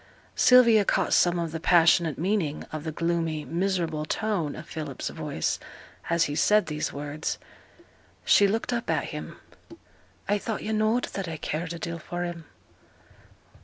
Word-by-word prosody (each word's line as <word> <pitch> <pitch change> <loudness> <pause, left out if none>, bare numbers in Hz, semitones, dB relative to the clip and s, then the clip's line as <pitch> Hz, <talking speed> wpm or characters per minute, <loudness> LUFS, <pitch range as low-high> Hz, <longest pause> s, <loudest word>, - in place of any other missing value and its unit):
Sylvia 235 -4 +6
caught 190 -1 +1
some 175 0 +4
of 170 -2 -2
the 165 - -4
passionate 170 -2 +4
meaning 175 -4 -1
of 155 0 -6
the 160 - -2
gloomy, 165 -1 -1
miserable 170 -3 -1
tone 175 -3 -2
of 155 +2 -9
Philip's 150 -4 -5
voice - - -2 0.5
as 170 0 +3
he 145 - -2
said 210 +7 +3
these 150 -1 -3
words. 145 +2 -4 0.9
She 200 - +6
looked 225 +4 -1
up 235 0 -3
at - - +1
him. - - -7 0.9
'I 205 +1 +2
thought 220 0 -4
yo' 220 - -3
knowed 215 +3 +2
that 195 -2 -4
I 160 -1 -5
cared 160 +3 -3
a - - -6
deal 170 0 -5
for 175 +2 -5
him.' 170 -2 -6
170 Hz, 160 wpm, -26 LUFS, 155-200 Hz, 0.9 s, Sylvia